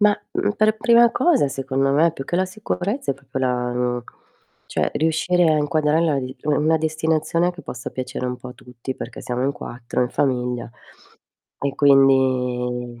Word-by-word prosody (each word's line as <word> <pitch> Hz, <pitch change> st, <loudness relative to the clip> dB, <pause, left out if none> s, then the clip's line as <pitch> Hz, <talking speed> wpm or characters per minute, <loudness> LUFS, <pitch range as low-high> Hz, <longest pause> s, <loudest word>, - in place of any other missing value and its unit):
Mah, 210 Hz, 0 st, +5 dB, 0.2 s
mhmm, 205 Hz, -, +1 dB
per 215 Hz, 0 st, +3 dB
prima 235 Hz, +1 st, +5 dB
cosa 265 Hz, -, +2 dB
secondo 135 Hz, 0 st, -1 dB
me 155 Hz, +4 st, +3 dB
più 135 Hz, -, -7 dB
che 175 Hz, -, -2 dB
la 185 Hz, -, +2 dB
sicurezza 205 Hz, -, -3 dB
è -, -, -11 dB
proprio 135 Hz, -1 st, -7 dB
la 125 Hz, -1 st, 0 dB
mhmm, 125 Hz, 0 st, -1 dB, 0.6 s
cioè -, -, -1 dB
riuscire 160 Hz, +3 st, +2 dB
a 155 Hz, -, +3 dB
inquadrarla 150 Hz, 0 st, +1 dB
d 130 Hz, 0 st, -7 dB
u 150 Hz, -, -1 dB
una 155 Hz, +3 st, +3 dB
destinazione 160 Hz, +2 st, 0 dB
che 180 Hz, -, -12 dB
possa 125 Hz, 0 st, -6 dB
piacere 130 Hz, 0 st, -4 dB
un 125 Hz, 0 st, -3 dB
po' 125 Hz, -, -10 dB
a 125 Hz, -, -9 dB
tutti 125 Hz, +1 st, -8 dB
perché 120 Hz, -, -8 dB
siamo 125 Hz, 0 st, -2 dB
in 140 Hz, -, +1 dB
4 120 Hz, -2 st, -4 dB
in 125 Hz, -, -2 dB
famiglia 125 Hz, -3 st, -1 dB, 0.9 s
e 140 Hz, -1 st, -2 dB
quindi 125 Hz, -3 st, +2 dB
140 Hz, 175 wpm, -22 LUFS, 125-160 Hz, 0.9 s, Mah